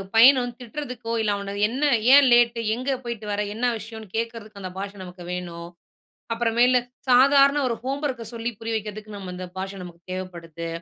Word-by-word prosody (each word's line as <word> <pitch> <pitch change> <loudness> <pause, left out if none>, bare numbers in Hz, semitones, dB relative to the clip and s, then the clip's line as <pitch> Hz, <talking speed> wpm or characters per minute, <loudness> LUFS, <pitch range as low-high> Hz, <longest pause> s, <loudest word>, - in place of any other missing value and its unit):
பையன 255 +4 +8
வந்து 245 -1 -5
திட்றதுக்கோ, 245 -2 -5
இல்ல 215 -1 +1
அவன 200 0 -5
என்ன, 260 +5 -3 0.3
ஏன் 280 -1 +8
லேட்டு. 240 -1 +4 0.2
எங்க 255 +3 -4
போய்ட்டு 235 -3 -5
வர, 205 0 0
என்ன 245 +3 +1
விஷயன்னு 220 +1 -9
கேக்குறதுக்கு 225 -3 -5
அந்த 185 -1 -5
பாஷ 200 +1 -4
நமக்கு 180 0 -10
வேணும். 170 -1 -6 0.7
அப்புறமேலு 240 +2 +3 0.3
சாதாரண 275 +3 +6
ஒரு 235 - 0
ஹோம்வொர்க்க 270 -1 -2
சொல்லி 230 +1 -2
புரிய 225 0 -3
வைக்கிறதுக்கு, 215 0 -6
நம்ம 190 -2 -7
அந்த 185 0 -6
பாஷை 195 +1 -4
நமக்கு 175 -1 -11
தேவப்படுது. 170 -3 -6
225 Hz, 165 wpm, -24 LUFS, 195-245 Hz, 0.7 s, பையன